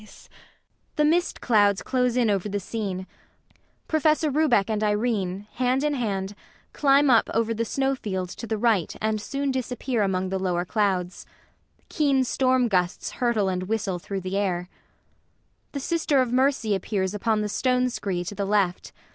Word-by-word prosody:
[The 300 - +3
mist 345 +4 +1
clouds 205 -4 +3
close 250 -1 0
in 235 -4 +3
over 200 +1 -1
the 205 0 -2
scene 195 -2 -4 0.8
PROFESSOR 310 -1 +2
RUBEK 270 -9 +3
and 215 -1 -1
IRENE, 210 -3 -1
hand 255 +2 0
in 300 0 +1
hand, 200 -6 -2 0.4
climb 280 -1 +4
up 230 - +4
over 230 0 +1
the 230 +1 -1
snow 270 +4 0
field 190 -8 -4
to 230 - -8
the 220 - -1
right 210 -6 +1
and 215 -1 -1
soon 275 +4 -2
disappear 250 -2 -2
among 190 -2 0
the 190 0 -2
lower 180 -2 -1
clouds. 185 -3 -1 0.6
Keen 280 -4 +2
storm 255 0 +2
gusts 180 -4 -1
hurtle 235 -5 0
and 185 0 -2
whistle 200 -5 -1
through 195 +2 -5
the 185 +2 -3
air. 180 -3 -1 1.0
[The 280 - -3
SISTER 305 -1 +1
OF 250 -2 +1
MERCY 260 -4 +2
appears 190 0 -1
upon 215 +1 0
the 210 - -1
stone 250 +4 +1
scree 185 -6 -3
to 180 - -6
the 200 -1 -2
left. 195 -3 0
215 Hz, 165 wpm, -25 LUFS, 195-255 Hz, 1.0 s, climb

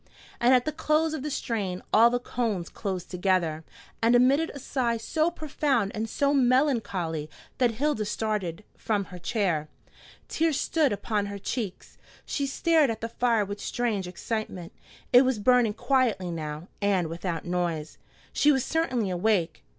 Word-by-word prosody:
And 240 +1 +4
at 250 - +2
the 310 - 0
close 310 0 +1
of 310 - -3
the 300 - -3
strain 205 -9 -3
all 230 +2 +7
the 245 - +1
cones 225 -7 -2
closed 190 -4 -5
together, 180 -4 0 0.4
and 230 +2 +4
emitted 275 +6 +4
a - - -5
sigh 250 -3 -1
so 315 +8 0
profound 285 - -1
and 220 +1 -3
so 280 +5 +1
melancholy 235 - +1 0.3
that 245 -3 +3
Hilda 270 -4 0
started 210 -4 -2
from 210 -3 -1
her 180 -1 -10
chair. 170 -7 -1 0.6
Tears 320 -3 +1
stood 310 -5 +2
upon 205 0 -1
her 200 0 -5
cheeks. 200 -1 -5 0.3
She 280 - -2
stared 310 0 +3
at 225 -1 -3
the 230 - -3
fire 230 -3 +1
with 205 +1 -6
strange 220 -6 -1
excitement. 185 -2 -5 0.4
It 245 - +9
was 260 -3 +1
burning 230 0 +3
quietly 230 -9 +1
now, 155 0 -5
and 195 -4 +2
without 170 +1 -4
noise. 175 -3 -2 0.3
She 295 - +4
was 265 -3 +1
certainly 255 - 0
awake. 180 -3 0
220 Hz, 160 wpm, -27 LUFS, 185-260 Hz, 0.6 s, It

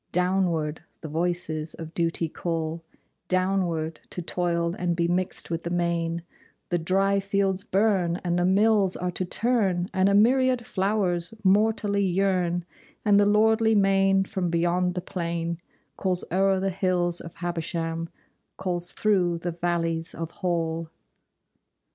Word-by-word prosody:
Downward 180 -4 0 0.2
the - - -6
voices 160 -1 -2
of 160 0 -8
Duty 165 -1 0
call 165 0 -3 0.4
Downward, 185 -4 0
to 180 - -5
toil 170 -1 -1
and 175 -1 0
be 170 0 +1
mixed 180 0 -1
with 165 0 -1
the 170 - -4
main, 170 -1 -1 0.5
The 175 - +1
dry 195 +4 +2
fields 195 -1 0
burn, 190 -4 +1
and 175 -1 0
the - - +2
mills 200 0 +3
are 180 0 -2
to 185 - -2
turn, 195 -4 +1
And 190 +1 +3
a 200 - +3
myriad 250 +2 +3
flowers 190 -2 -1
mortally 205 0 +2
yearn, 180 -2 +1 0.4
And 205 -1 +5
the 205 - +4
lordly 220 +1 +4
main 195 -1 +4
from 190 -3 -2
beyond 175 +2 +1
the 180 - -2
plain 170 -2 -3 0.4
Calls 185 -2 0
o'er 195 +1 +3
the 195 0 0
hills 180 -2 0
of 165 - -10
Habersham, 165 -1 -3 0.5
Calls 175 -2 -2
through 185 -5 +2
the 175 +1 -3
valleys 165 -1 -1
of 165 0 -5
Hall. 165 -2 -2
180 Hz, 140 wpm, -26 LUFS, 170-195 Hz, 0.5 s, And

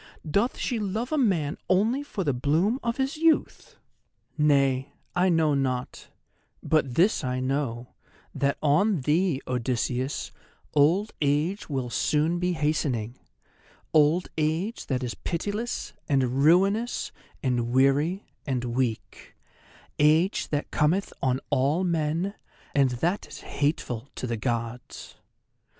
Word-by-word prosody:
Doth 200 +11 +1
she 240 - -1
love 215 +5 -2
a 310 - +1
man 170 - +1
only 220 +9 +2
for 250 -9 -4
the 145 -5 +1
bloom 160 - +1
of 235 0 -2
his 270 +3 -1
youth? 325 0 +1 0.6
Nay, 140 -3 +2 0.2
I 180 +1 +3
know 160 -3 +3
not; 130 -2 -2 0.6
but 140 -6 +1
this 180 0 +3
I 125 0 -1
know, 130 -2 -2 0.4
that 140 0 0
on 160 +4 +3
thee, 155 +1 +1
Odysseus, 125 +2 -2 0.4
old 170 +9 +3
age 150 +8 0
will 130 -4 -2
soon 155 +9 +1
be 180 0 0
hastening—old 150 +3 -1
age 165 +9 -1
that 130 -2 -1
is 120 - -3
pitiless, 205 +7 -3 0.2
and 135 -1 +2
ruinous, 195 +9 +3 0.3
and 120 -3 0
weary, 140 +9 +2 0.2
and 130 -3 -1
weak—age 140 - -1
that 145 -1 -3
cometh 165 +6 +1
on 130 -1 +1
all 145 +7 +2
men, 170 +2 0 0.4
and 140 -2 +4 0.2
that 185 +4 -1
is - - -10
hateful 140 -4 -2
to - - -4
the 120 -1 -2
Gods. 115 +1 -4
150 Hz, 120 wpm, -26 LUFS, 130-185 Hz, 0.6 s, and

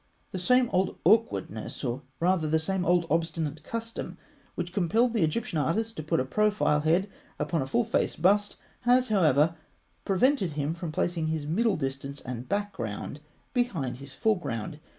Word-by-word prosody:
The 185 - -4
same 250 +6 +4
old 185 +1 +1
awkwardness, 215 - +1
or 125 +1 -2 0.2
rather 170 -2 +2
the 160 - +3
same 185 +3 -1
old 175 -1 +3
obstinate 160 -2 -1
custom, 230 +6 -5 0.4
which 175 +1 -4
compelled 220 +7 +2
the 225 - +1
Egyptian 160 +1 0
artist 220 +9 0
to - - -4
put 155 - 0
a 130 - 0
profile 210 -2 +2
head 165 +6 +2 0.3
upon 150 +1 -1
a 130 - -3
full 125 -2 +2
face - - 0
bust, 205 +4 +2 0.2
has, 250 0 +3
however, 165 -5 +4 0.5
prevented 195 - +2
him 145 +1 -1
from 170 -2 -5
placing 165 0 -1
his 155 -2 -2
middle 205 +6 +1
distance 135 0 -4
and 125 0 -6
background 150 - -3 0.3
behind 165 - -1
his 140 +1 -10
foreground. 150 - -1
170 Hz, 160 wpm, -28 LUFS, 150-205 Hz, 0.5 s, same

